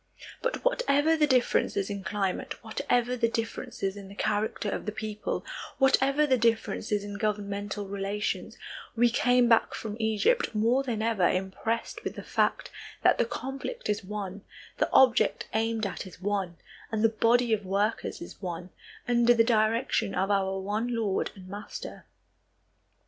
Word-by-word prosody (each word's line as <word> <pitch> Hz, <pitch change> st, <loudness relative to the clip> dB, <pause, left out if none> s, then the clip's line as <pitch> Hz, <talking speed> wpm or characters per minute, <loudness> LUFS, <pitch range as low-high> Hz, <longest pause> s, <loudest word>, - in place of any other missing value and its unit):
But -, -, -2 dB
whatever 325 Hz, -, +3 dB
the 305 Hz, -1 st, +3 dB
differences 245 Hz, -6 st, +2 dB
in 200 Hz, -2 st, -5 dB
climate, 195 Hz, +1 st, -2 dB
whatever 240 Hz, +2 st, 0 dB
the 230 Hz, -1 st, +2 dB
differences 225 Hz, -4 st, -3 dB
in 200 Hz, -1 st, -9 dB
the 200 Hz, -, -11 dB
character 215 Hz, +1 st, -1 dB
of -, -, -4 dB
the -, -, 0 dB
people, 215 Hz, 0 st, -4 dB, 0.3 s
whatever 270 Hz, +2 st, +4 dB
the 260 Hz, -4 st, +2 dB
differences 225 Hz, -2 st, +1 dB
in 205 Hz, -1 st, -6 dB
governmental 205 Hz, -1 st, -2 dB
relations, 200 Hz, +1 st, -3 dB, 0.4 s
we 240 Hz, 0 st, +4 dB
came 245 Hz, 0 st, +4 dB
back 230 Hz, -1 st, +3 dB
from 215 Hz, -2 st, -5 dB
Egypt 220 Hz, -, +1 dB
more 230 Hz, +5 st, +3 dB
than 235 Hz, -5 st, -2 dB
ever 220 Hz, -6 st, +3 dB
impressed 190 Hz, +5 st, -2 dB
with -, -, -4 dB
the -, -, -7 dB
fact -, -, 0 dB, 0.3 s
that -, -, +5 dB
the -, -, +4 dB
conflict 270 Hz, -, -5 dB
is 205 Hz, -1 st, 0 dB
one, 200 Hz, 0 st, -5 dB, 0.4 s
the -, -, +2 dB
object 255 Hz, -3 st, +4 dB
aimed 225 Hz, 0 st, 0 dB
at 195 Hz, 0 st, -4 dB
is 180 Hz, -, -13 dB
one, 190 Hz, -3 st, -2 dB, 0.3 s
and 220 Hz, -1 st, 0 dB
the -, -, +7 dB
body 230 Hz, +2 st, +3 dB
of 210 Hz, -2 st, 0 dB
workers 200 Hz, +4 st, -1 dB
is 175 Hz, -, -12 dB
one, 175 Hz, -1 st, -5 dB, 0.4 s
under 240 Hz, 0 st, +4 dB
the 230 Hz, -, +5 dB
direction 225 Hz, -1 st, +1 dB
of 195 Hz, +2 st, +1 dB
our 195 Hz, -1 st, +1 dB
one 215 Hz, +5 st, -2 dB
Lord 210 Hz, -4 st, 0 dB
and 185 Hz, -2 st, -12 dB
Master. 205 Hz, +2 st, -8 dB
215 Hz, 155 wpm, -28 LUFS, 200-240 Hz, 0.4 s, the